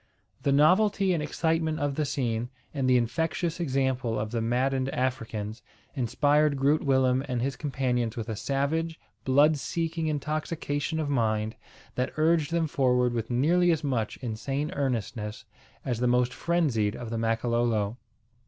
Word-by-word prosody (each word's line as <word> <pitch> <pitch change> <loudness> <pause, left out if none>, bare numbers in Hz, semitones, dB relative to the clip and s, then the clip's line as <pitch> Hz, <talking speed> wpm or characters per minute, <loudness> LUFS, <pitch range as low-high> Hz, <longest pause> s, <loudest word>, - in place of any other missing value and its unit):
The 140 - +1
novelty 185 +6 +4
and 165 - 0
excitement 160 +1 0
of 145 -1 0
the 150 +2 -1
scene, 120 -4 -1 0.2
and 135 -3 0
the 125 - +6
infectious 160 +7 -1
example 130 -6 0
of 105 0 -3
the 115 -1 -1
maddened 130 +3 0
Africans, 115 -5 -3 0.3
inspired 145 +3 +2
Groot 140 +3 +2
Willem 130 -1 +3
and 125 -2 -1
his 135 +2 -1
companions 125 -4 -1
with 115 -1 -4
a 110 - -3
savage, 155 +7 -1 0.3
blood 145 +4 +4
seeking 165 +2 -2
intoxication 155 +1 -2
of 155 - -1
mind 110 -5 0 0.4
that 125 +1 -2
urged 155 -1 +3
them 170 -1 +1
forward 125 -4 +2
with 115 -1 -3
nearly 165 +9 +3
as 160 -2 +1
much 125 -7 -1
insane 135 +6 -2
earnestness 110 -5 -3 0.4
as 120 -3 -1
the 125 - +2
most 125 0 +2
frenzied 140 -12 +1
of 120 -2 -7
the 115 - -2
Makololo. 115 -1 0
135 Hz, 150 wpm, -27 LUFS, 120-155 Hz, 0.4 s, the